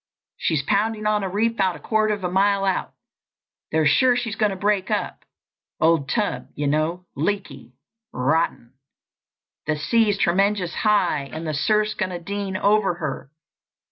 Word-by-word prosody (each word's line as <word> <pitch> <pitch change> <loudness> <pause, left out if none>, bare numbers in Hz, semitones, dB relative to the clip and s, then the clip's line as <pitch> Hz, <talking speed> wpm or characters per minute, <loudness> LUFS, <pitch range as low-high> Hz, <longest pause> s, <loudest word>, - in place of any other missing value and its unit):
She's 155 -4 0
pounding 215 +6 0
on 210 0 +2
a 190 - -2
reef 225 +4 0
'bout 190 -4 +1
a - - -10
quarter 215 -1 +1
of 205 - -11
a 180 - -1
mile 195 +1 +2
out. 190 -1 -1 0.8
They're 160 0 +2
sure 245 - +4
she's 235 -3 -2
going 210 -1 +2
to 195 - -4
break 200 0 0
up—old 160 -4 -2
tub, 210 -3 -1
you 145 - -2
know—leaky—rotten. 155 - -2 0.9
The 155 - +1
sea's 205 +7 +2
tremenjus 195 -1 +1
high, 180 -10 +1
and 160 +1 -6
the 155 - -2
surfs 210 +8 +1
going 185 -3 -4
dean 200 0 -3
over 200 -2 +2
her. 150 -5 -5
190 Hz, 140 wpm, -23 LUFS, 155-210 Hz, 0.9 s, sure